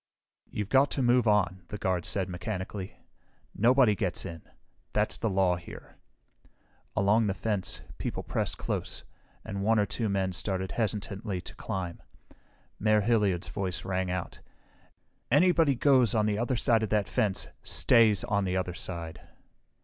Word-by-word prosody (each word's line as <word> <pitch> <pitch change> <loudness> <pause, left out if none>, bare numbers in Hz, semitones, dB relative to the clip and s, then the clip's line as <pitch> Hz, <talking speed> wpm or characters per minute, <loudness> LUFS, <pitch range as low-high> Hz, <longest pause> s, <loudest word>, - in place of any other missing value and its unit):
"You've 105 -1 -4
got 135 +1 +4
to 135 - +1
move 120 -1 +3
on," 100 -3 +2
the 105 - -6
guard 90 -3 -1
said 95 -2 +1
mechanically. 95 +1 -5 0.6
"Nobody 120 0 +4
gets 95 -4 -2
in. 85 -3 -7 0.5
That's - - +1
the 115 - -1
law 95 -2 +2
here." 85 - -12 1.0
Along 105 +2 +3
the 95 - -1
fence, 100 0 -2 0.2
people - - -3
pressed - - -2
close, - - -4 0.4
and 100 0 -4
one 110 +3 +3
or 105 - +3
two 110 +1 -2
men 95 -2 0
started 95 +1 -2
hesitantly 105 -2 -2
to - - -10
climb. 90 -3 -5 0.8
Mayor 110 0 +3
Hilliard's 105 -5 +1
voice 95 -4 -4
rang 95 -1 -1
out, 90 -1 -4 0.9
"Anybody 165 +1 +4
who - - -7
goes 130 -5 +4
on 105 -1 +3
the 105 0 0
other 120 +2 0
side 115 -1 +3
of 110 - -1
that 105 -2 +1
fence 100 -3 0
stays 110 -4 +4
on 100 0 0
the 95 0 -1
other 90 -1 -2
side!" 85 -2 -5
100 Hz, 155 wpm, -29 LUFS, 95-110 Hz, 1.0 s, got